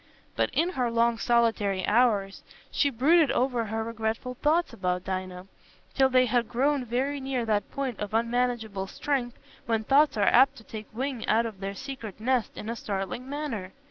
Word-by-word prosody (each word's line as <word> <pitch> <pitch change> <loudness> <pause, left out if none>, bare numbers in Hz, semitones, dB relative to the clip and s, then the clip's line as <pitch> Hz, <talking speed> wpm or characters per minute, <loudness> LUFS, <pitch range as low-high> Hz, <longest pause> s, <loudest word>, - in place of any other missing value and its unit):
But - - +1
in 340 +3 +1
her 255 -9 -1
long 230 0 +2
solitary 225 -5 +1
hours 210 -4 +2 0.3
she 285 - +2
brooded 295 +6 +4
over 245 -2 +1
her 220 +1 -2
regretful 225 +2 -3
thoughts 310 +7 +1
about 180 -1 -2
Dinah, 185 -1 -4 0.5
till 265 -1 +4
they 255 0 +4
had 240 -2 0
grown 270 +3 +1
very 265 +5 -1
near 265 -3 -2
that 210 -2 0
point 265 -4 -4
of 210 -1 -4
unmanageable 230 -3 -1
strength 250 +1 -2 0.3
when 225 -1 +1
thoughts 285 +3 +4
are 205 - +2
apt 265 +5 +5
to 225 - -13
take 215 -1 -8
wing 255 0 -3
out 225 +2 +3
of 215 -4 -6
their 195 0 -4
secret 260 -5 -7
nest 245 +1 0
in 210 - -6
a 230 - -2
startling 205 +4 -4
manner. 270 -11 -4
235 Hz, 175 wpm, -27 LUFS, 215-265 Hz, 0.5 s, apt